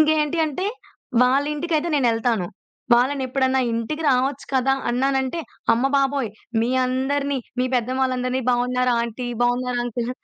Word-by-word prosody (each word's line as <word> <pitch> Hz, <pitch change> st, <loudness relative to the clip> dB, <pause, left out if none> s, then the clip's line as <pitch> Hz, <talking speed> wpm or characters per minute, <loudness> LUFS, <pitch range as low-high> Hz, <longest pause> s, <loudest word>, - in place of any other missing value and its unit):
ఇంకేంటి 310 Hz, +1 st, +2 dB
అంటే 365 Hz, +7 st, -3 dB, 0.6 s
వాళ్ళింటికైతే 300 Hz, +5 st, +1 dB
నేనెళ్తాను. 230 Hz, -6 st, +1 dB, 0.5 s
వాళ్ళని 265 Hz, +3 st, +2 dB
ఎప్పుడన్నా 260 Hz, 0 st, +1 dB
"ఇంటికి 230 Hz, +8 st, -3 dB
రావచ్చు 265 Hz, +1 st, +1 dB
కదా!" 265 Hz, 0 st, +2 dB, 0.2 s
అన్నానంటే, 265 Hz, +5 st, 0 dB, 0.3 s
"అమ్మ 240 Hz, +4 st, +2 dB
బాబోయ్! 275 Hz, -5 st, +1 dB, 0.3 s
మీ 230 Hz, -, +1 dB, 0.2 s
అందరిని, 275 Hz, +2 st, -1 dB, 0.2 s
మీ -, -, +2 dB
పెద్దవాళ్ళందరిని 255 Hz, +1 st, 0 dB
బావున్నారా 250 Hz, 0 st, +1 dB
అంటి? 245 Hz, +2 st, -6 dB, 0.2 s
బావున్నారా 245 Hz, 0 st, 0 dB
అంకుల్? 240 Hz, 0 st, -3 dB
260 Hz, 115 wpm, -22 LUFS, 245-280 Hz, 0.6 s, ఇంకేంటి